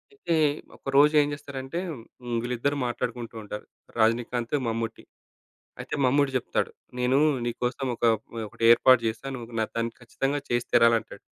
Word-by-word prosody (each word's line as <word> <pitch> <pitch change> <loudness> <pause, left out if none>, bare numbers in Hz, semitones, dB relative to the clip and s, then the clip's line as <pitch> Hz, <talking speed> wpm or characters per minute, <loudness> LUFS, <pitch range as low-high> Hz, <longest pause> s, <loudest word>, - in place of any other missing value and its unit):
అయితే 170 - -1 0.4
ఒకరోజు 140 +2 +4
ఏం 145 - +1
చేస్తారంటే 140 +2 -5
హ్మ్, 120 -3 -7
వీళ్ళిద్దరూ 125 +4 -1
మాట్లాడుకుంటూ 120 -1 -4
ఉంటారు. 105 0 -7 0.3
రజనీకాంత్, 120 +3 +1
మమ్ముటి. 115 0 -3 0.8
అయితే - - -4
మమ్ముట్టి 140 +2 +3
చెప్తాడు. 125 - -2 0.3
నేను 125 +2 +3 0.3
నీకోసం 125 +3 -2
ఒక 115 - -14
ఒక 110 - -17
ఒకటి 110 - -8
ఏర్పాటు 130 +1 +6
జేశా. 115 +4 -3
నువ్వు 120 -2 -8
న - - +3
దాన్ని 115 0 -1
ఖచ్చితంగా 135 +4 -2
చేసి 120 0 +1
తీరాలి 115 0 +6
అంటాడు. - - -13
120 Hz, 145 wpm, -26 LUFS, 115-135 Hz, 0.8 s, ఏర్పాటు